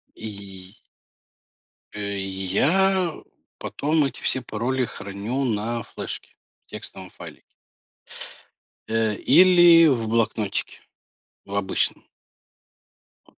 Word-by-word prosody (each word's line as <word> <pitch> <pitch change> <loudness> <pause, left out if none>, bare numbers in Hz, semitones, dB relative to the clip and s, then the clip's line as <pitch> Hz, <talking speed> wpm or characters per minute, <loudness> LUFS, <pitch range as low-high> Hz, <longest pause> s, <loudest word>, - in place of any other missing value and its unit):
И 100 -2 -10 1.2
Э, 100 -1 -4
я 155 - +1 0.4
потом 150 0 0
эти 135 - -5
все 130 - 0
пароли 125 +3 -2
храню 100 +7 -4
на 115 -1 -2
флешке - - -8 0.3
в - - -44
текстовом 95 -1 -8
файлике. - - -12 1.4
Э, 110 -1 +1
или 175 - +7
в 115 -6 +1
блокнотике 110 -3 -1 0.6
в 100 - -7
обычном. 95 -1 -1 1.2
Вот. - - -27
115 Hz, 90 wpm, -24 LUFS, 100-140 Hz, 1.4 s, или